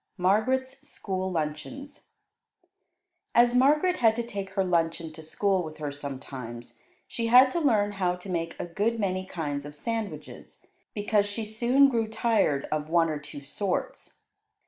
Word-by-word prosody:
MARGARET'S 255 +8 +1
SCHOOL 190 -5 -3
LUNCHEONS 180 - -5 1.3
As 240 0 +5
Margaret 300 +8 +4
had 225 -2 +4
to 235 - -2
take 200 -4 -5
her 195 0 +1
luncheon 165 -2 0
to 160 - -10
school 190 +4 0
with 155 -2 -7
her 150 -2 -4
sometimes, 130 -4 -7 0.3
she 230 -1 -3
had 255 +3 +7
to 340 - 0
learn 215 -9 +2
how 185 -3 0
to 180 +2 -11
make 170 -2 -3
a - - -2
good 210 +7 -1
many 185 -2 -1
kinds 145 -6 -3
of 145 0 -9
sandwiches, 225 +5 -6 0.3
because 205 -1 +1
she 215 +2 -4
soon 240 +6 +4
grew 230 -4 0
tired 220 - +1
of 155 0 -2
one 165 0 +3
or 150 - -3
two 145 -1 -9
sorts. 190 +6 -4
195 Hz, 155 wpm, -27 LUFS, 160-230 Hz, 1.3 s, had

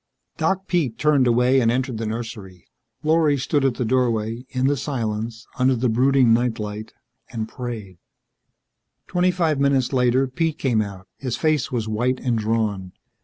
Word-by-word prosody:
Doc 190 0 0
Pete 155 - 0
turned 145 -4 +3
away 125 +2 +4
and 115 -3 +3
entered 125 -1 -1
the 115 - -2
nursery. 110 -5 -6 0.4
Lorry 155 -2 +3
stood 140 +2 0
at 135 -3 +2
the 125 - -2
doorway, 115 -1 0
in 130 0 -1
the 145 +1 +3
silence, 115 -4 -3
under 130 +1 +3
the 125 +1 0
brooding 130 +1 +4
night 120 0 +1
light, 105 0 -6 0.4
and 110 -2 -4
prayed. 110 -8 -7 1.1
Twenty 180 0 +1
five 165 -5 +1
minutes 140 -2 +2
later, 125 +1 +3
Pete 160 +4 -1
came 120 -5 +1
out. 95 -2 -7
His 125 -3 -3
face 155 -4 +1
was 115 -3 -2
white 120 +4 0
and 125 -3 0
drawn. 105 -4 -1
125 Hz, 165 wpm, -22 LUFS, 110-135 Hz, 1.1 s, away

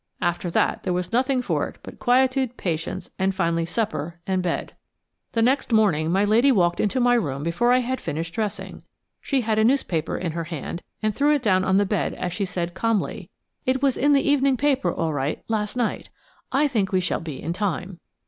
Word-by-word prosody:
After 175 0 -1
that - - +1
there 185 - -1
was 180 +4 -3
nothing 255 +1 +2
for - - 0
it - - -15
but - - -11
quietude, 255 0 +2
patience, 165 -2 -3
and 190 0 +1
finally 170 -3 0
supper 170 -6 -3
and 190 -1 0
bed. 180 -2 -2 0.6
The 230 - +2
next 260 +2 +1
morning 175 -8 +3
my 195 +3 +3
lady 230 +7 +4
walked 175 -7 +2
into 215 +5 +1
my 245 0 +4
room 145 - 0
before 170 +9 +1
I 255 +1 +4
had 255 +1 -3
finished 165 +3 -4
dressing. 210 +1 -4 0.4
She 275 -2 0
had 220 -2 0
a - - +4
newspaper 220 - +1
in 175 -3 -2
her 165 +1 -4
hand, 170 +1 -5 0.2
and 215 0 +1
threw 295 +1 +3
it 280 - -2
down 185 -4 +3
on 190 0 +3
the 205 - +3
bed 200 0 -1
as 180 - -3
she 200 +2 -1
said 175 -1 -3
calmly: 225 0 -1 0.4
"It 260 +1 +1
was 270 -2 +3
in 290 +2 +3
the 275 - +3
evening 275 -2 +3
paper 270 -9 +1
all 165 -2 -1
right 145 +1 -2
last 215 +1 -2
night. 240 -3 -1 0.4
I 285 +3 +3
think 215 -8 0
we 185 - +3
shall 180 -1 -1
be 155 -5 -6
in 165 - -3
time." 185 -2 -3
205 Hz, 210 wpm, -24 LUFS, 175-250 Hz, 0.6 s, lady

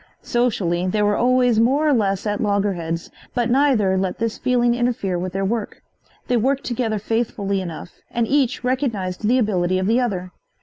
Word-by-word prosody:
Socially 185 -8 0
they 210 +3 +1
were 205 0 +2
always 250 -2 +3
more 275 +7 +3
or 295 - +4
less 195 -5 0
at 210 -1 -1
loggerheads, 195 -5 -1 0.2
but 240 -1 +1
neither 240 -9 +3
let 190 -1 -2
this 230 0 -2
feeling 240 -1 +2
interfere 240 -7 -1
with 185 +1 -3
their 195 0 -1
work. 220 +1 -3 0.4
They 250 - +2
worked 265 +4 +1
together 230 -3 -1
faithfully 205 -2 -1
enough 175 -1 -7 0.2
and 235 -1 0
each 270 -2 +1
recognized 225 -7 -1
the 250 +3 +4
ability 185 -6 +1
of 185 - -1
the 230 +5 +3
other. 185 -7 -2
215 Hz, 175 wpm, -21 LUFS, 190-245 Hz, 0.4 s, or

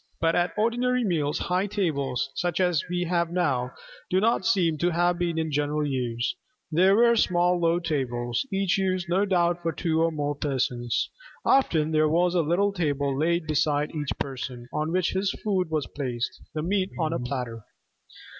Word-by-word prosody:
But 165 0 +2
at 175 +2 0
ordinary 245 +3 +1
meals, 155 -6 0
high 185 +3 0
tables, 140 - -1
such 175 -1 -1
as 180 -5 +2
we 180 0 -1
have 170 -1 0
now, 140 -9 0 0.4
do 185 - +3
not 215 -2 +2
seem 170 -8 +2
to 175 - +2
have 175 +1 +1
been 170 -2 -1
in 160 -1 -1
general 150 +1 0
use. 125 -3 -2 0.4
There 185 +5 +5
were 235 +1 +5
small 180 -4 +2
low 170 0 +2
tables, 120 -8 -1
each 195 -1 +1
used 185 -2 -1
no 190 +4 +2
doubt 175 -2 +1
for 165 -1 -1
two 160 -1 0
or 165 - +3
more 145 -2 -2
persons. 130 -4 -1 0.3
Often 160 - +3
there 155 -1 +3
was 175 +3 +2
a 175 - +3
little 180 +6 +1
table 145 -6 0
laid 170 +3 +1
beside 150 -1 0
each 150 -3 -3
person, 125 -2 -5
on 155 +1 -1
which 185 0 +1
his 190 +1 0
food 190 -5 0
was 155 -3 -1
placed 125 -4 -4
the 155 - -2
meat 190 +2 0
on 160 -1 0
a - - -1
platter. 125 -3 -4
165 Hz, 180 wpm, -26 LUFS, 145-180 Hz, 0.4 s, There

